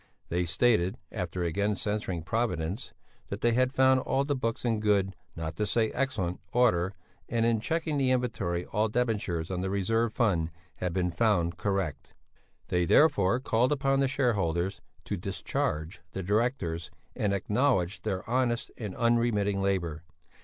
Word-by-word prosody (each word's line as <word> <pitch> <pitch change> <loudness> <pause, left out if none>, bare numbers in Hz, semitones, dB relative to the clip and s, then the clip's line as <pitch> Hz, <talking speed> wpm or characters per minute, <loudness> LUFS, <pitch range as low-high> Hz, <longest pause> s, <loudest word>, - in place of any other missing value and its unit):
They 90 +1 0
stated 95 0 +2
after 90 -3 -3
again 100 +5 0
censuring 100 -5 -2
Providence 95 -2 -2 0.4
that 100 - -5
they 120 - +3
had 130 +2 +2
found 130 0 +4
all 135 +1 0
the 145 0 0
books 115 -2 -2
in 115 -2 +1
good 100 -2 +2 0.2
not 80 -1 -5
to 105 - +1
say 110 0 +1
excellent 115 -10 -1
order, 100 -6 +2 0.3
and 115 -1 +1
in 115 -1 +3
checking 160 +3 -1
the 135 -2 +2
inventory 110 -9 0
all 110 +1 0
debentures 105 -8 -1
on 90 -1 -2
the 95 - -1
reserve 115 +4 +1
fund 90 -9 +1 0.3
had 90 - -2
been 90 0 0
found 85 -3 +1
correct 95 -6 -2 0.2
(!) - - -39
They 90 -1 +2
therefore 100 - +4
called 125 0 +2
upon 135 -1 +2
the 135 - +3
shareholders 95 - 0 0.2
to - - -2
discharge 80 +4 -2
the 95 - -3
directors 100 - 0 0.3
and 105 - 0
acknowledge 100 -3 +1
their 95 0 -3
honest 120 0 0
and 105 -5 -5
unremitting 115 -4 +2
labour. 90 -5 -1
105 Hz, 155 wpm, -29 LUFS, 90-120 Hz, 0.4 s, found